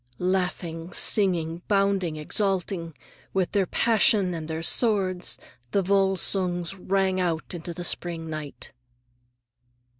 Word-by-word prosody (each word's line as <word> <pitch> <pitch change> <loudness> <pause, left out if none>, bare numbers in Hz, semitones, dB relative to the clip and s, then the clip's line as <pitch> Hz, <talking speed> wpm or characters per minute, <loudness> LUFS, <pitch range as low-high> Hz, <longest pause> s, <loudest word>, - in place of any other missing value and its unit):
_" - - -43
Laughing, 180 -2 -1
singing, 170 -5 +1
bounding, 195 -5 +2
exulting,—with 180 +1 -2
their 195 -3 +2
passion 210 -4 +3
and 160 -2 -5
their 160 0 -3
sword,—the 185 - 0
Volsungs 190 -2 +1
ran 190 0 0
out 170 -2 -1
into 175 0 -5
the 175 +1 -6
spring 170 -1 -2
night. 155 -2 -5
180 Hz, 100 wpm, -26 LUFS, 165-195 Hz, -, passion